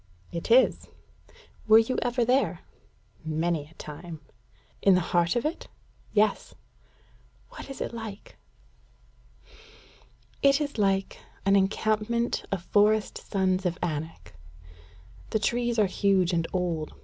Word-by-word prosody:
"It 170 +4 -5
is." 250 +3 +4 0.8
"Were 220 0 +8
you 225 +3 +2
ever 245 -1 0
there?" 255 +3 +1 0.6
"Many 160 -1 -1
a 160 - -21
time." 160 +2 -9 0.6
"In 195 -2 +5
the - - +4
heart 170 +2 +3
of 240 - 0
it?" 310 - -3 0.4
"Yes." 215 0 +1 0.9
"What - - -10
is 275 - -8
it - - -3
like?" 220 -3 -8 2.1
"It 275 0 +4
is 285 -5 -3
like 195 -1 0 0.3
an 195 0 +4
encampment 215 +4 0
of 195 -3 -2
forest 210 +2 +2
sons 190 -2 0
of 180 -1 -1
Anak. 160 - -5 1.0
The - - +1
trees 240 +2 0
are 215 - +4
huge 190 -2 +1
and 165 -1 0
old. 170 -4 -2
200 Hz, 125 wpm, -27 LUFS, 175-235 Hz, 2.1 s, Were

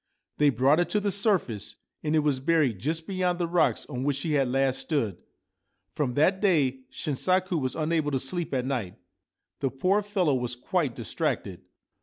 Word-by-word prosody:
They 150 -1 +5
brought 135 +5 +3
it 175 - +1
to 210 - +1
the 205 0 0
surface, 190 - 0 0.3
and 155 0 0
it 155 - +3
was 140 -3 +2
buried 140 - +2
just 160 - -2
beyond 180 -2 0
the 175 - 0
rocks 170 +1 +1
on 130 -3 -5
which 145 0 +1
she 155 +3 -2
had 135 -3 +3
last 135 0 +1
stood. 115 - -1 0.7
From 130 -5 -1
that 185 +6 +3
day 145 -10 +2
Shinsaku 180 +3 0
was 130 -1 -2
unable 155 -1 0
to 135 -2 0
sleep 170 +6 -3
at 130 -2 -1
night. 115 -9 -2 0.6
The 135 - 0
poor 185 - +1
fellow 195 -7 +1
was 125 -1 -1
quite 145 +1 -1
distracted. 110 -7 -3
150 Hz, 180 wpm, -27 LUFS, 130-175 Hz, 0.7 s, They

